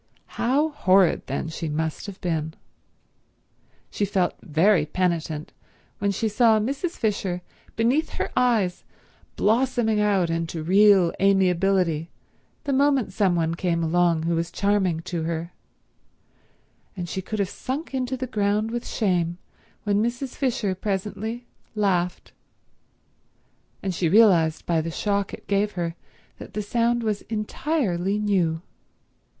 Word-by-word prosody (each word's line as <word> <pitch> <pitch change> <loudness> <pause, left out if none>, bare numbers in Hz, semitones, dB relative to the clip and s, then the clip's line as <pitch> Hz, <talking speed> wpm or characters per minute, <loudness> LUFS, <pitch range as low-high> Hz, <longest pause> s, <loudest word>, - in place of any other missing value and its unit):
How 280 +6 +2
horrid, 190 - +3
then, 140 +4 -3
she 160 0 -4
must 160 +5 -3
have 200 -2 -8
been. 160 -3 -2 1.4
She - - -2
felt 190 -3 +1
very 170 +1 +3
penitent 160 -2 -2 0.5
when 200 - +1
she 200 +3 0
saw 220 +1 +4
Mrs. 275 - -2
Fisher 195 -5 -1 0.3
beneath 250 +8 +2
her - - -3
eyes 220 -8 +2 0.5
blossoming 230 -1 +2
out 195 -5 +2
into 165 -1 -3
real 190 0 +5
amiability 185 -4 +2 0.5
the 285 -2 -1
moment 275 -3 +2
some 190 -4 +2
one 165 -1 0
came 170 -1 -1
along 170 0 +2
who 170 +1 0
was 165 +1 -1
charming 190 -5 +1
to 175 -1 -4
her, 170 +1 -3 1.4
and 175 -1 -4
she 190 - -3
could 215 +4 -5
have 200 -2 +1
sunk 275 - -5
into 260 0 -2
the 255 - -3
ground 210 -1 0
with 240 0 -4
shame 175 -5 0 0.5
when 205 -1 +1
Mrs. 240 +4 -2
Fisher 235 -7 -1
presently 210 +4 -3 0.3
laughed, 180 -4 0 1.5
and 190 -1 -1
she 170 -1 0
realized 175 -6 +4
by 165 -2 +1
the 165 - -4
shock 200 +3 -1
it - - -9
gave 205 +1 0
her 170 -2 -3 0.4
that - - -11
the 210 - -1
sound 235 +2 +1
was 210 -2 -1
entirely 210 - -1
new. 180 -6 0
195 Hz, 135 wpm, -24 LUFS, 170-220 Hz, 1.5 s, real